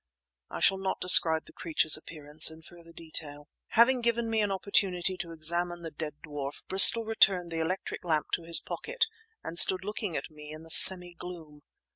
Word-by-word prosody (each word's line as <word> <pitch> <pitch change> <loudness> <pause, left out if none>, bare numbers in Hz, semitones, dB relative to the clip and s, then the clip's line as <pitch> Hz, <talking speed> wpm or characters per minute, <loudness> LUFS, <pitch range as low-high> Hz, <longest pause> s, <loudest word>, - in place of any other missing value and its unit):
I - - -9
shall 195 0 +2
not 190 0 -5
describe 160 -3 +5
the - - -11
creature's 155 -1 +2
appearance 155 -1 0
in 160 0 -15
further 170 0 -18
detail. 150 -3 -9 0.2
Having 245 +2 +1
given 235 -1 -3
me 220 -1 -1
an 205 - -2
opportunity 190 -1 -1
to 175 -4 -8
examine 170 +2 -1
the 165 - -9
dead 150 -1 -9
dwarf, 145 -2 -9
Bristol 195 +4 +5
returned 190 -5 +1
the 165 - -5
electric 185 +4 -6
lamp 155 -3 -3
to - - -3
his 165 0 +3
pocket - - -4 0.4
and 170 +1 0
stood 185 0 +2
looking 210 -4 -6
at 140 - -9
me 150 0 -14
in 155 +1 -12
the 165 - -11
semi 180 0 +6
gloom. 165 -4 -13
170 Hz, 185 wpm, -26 LUFS, 155-190 Hz, 0.4 s, semi